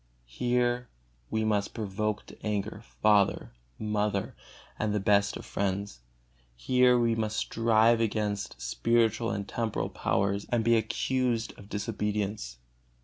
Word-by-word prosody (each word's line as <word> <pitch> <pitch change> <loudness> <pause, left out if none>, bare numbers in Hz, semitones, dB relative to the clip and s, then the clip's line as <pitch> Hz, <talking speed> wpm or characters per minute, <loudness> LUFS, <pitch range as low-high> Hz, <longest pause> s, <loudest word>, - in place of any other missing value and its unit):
Here 120 - 0 0.4
we 110 0 0
must 105 -2 0
provoke 105 0 -2
to - - -15
anger 105 0 -2 0.2
father, 105 -2 +3 0.3
mother, 105 -2 -1 0.4
and 105 -1 0
the - - +2
best 100 +1 +2
of - - -10
friends. 100 -6 -2 0.6
Here 125 - +4
we 115 -1 +2
must 110 -1 -1
strive 115 0 +3
against 105 - -1
spiritual 115 - +1
and 100 -3 -3
temporal 115 -2 -2
powers, 100 +1 0
and 120 -2 +1
be 115 +1 +4
accused 115 +1 0
of 100 - -14
disobedience. 105 - -3
105 Hz, 125 wpm, -29 LUFS, 100-115 Hz, 0.6 s, Here